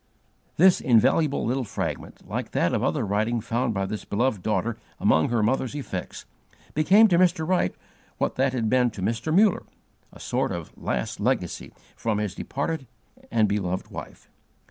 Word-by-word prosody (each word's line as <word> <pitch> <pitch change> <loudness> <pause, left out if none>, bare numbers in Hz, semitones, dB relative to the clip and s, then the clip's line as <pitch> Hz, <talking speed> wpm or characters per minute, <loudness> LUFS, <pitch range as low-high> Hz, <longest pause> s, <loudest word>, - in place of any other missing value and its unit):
This 185 +2 +5
invaluable 135 +5 +3
little 130 +3 0
fragment, 105 - -5
like - - -4
that - - +1
other - - 0
writing 110 +4 0
found 115 +2 -1
by 95 0 0
this 105 +2 -5
beloved 110 -1 0
daughter 110 +3 -1 0.2
among 80 - +3
her 115 -2 +1
mother's 130 +4 0
effects, 95 -11 -6 0.5
became 195 +9 +6
to 175 -2 +4
Mr. 175 -3 +2
Wright 180 - +1 0.4
what - - 0
that 135 +1 +1
had 115 -4 0
been 125 +1 +3
to 100 -4 -7
Mr. 115 +9 -1
Muller, 200 +3 +4 0.5
a - - -15
sort - - -1
of - - -6
last 60 -1 -3
legacy - - -1 0.2
from 110 -2 -1
his 105 -3 -2
departed 140 - -4 0.4
and 110 -2 +3
beloved 95 -3 -2
wife. - - -9
120 Hz, 160 wpm, -25 LUFS, 105-145 Hz, 0.5 s, became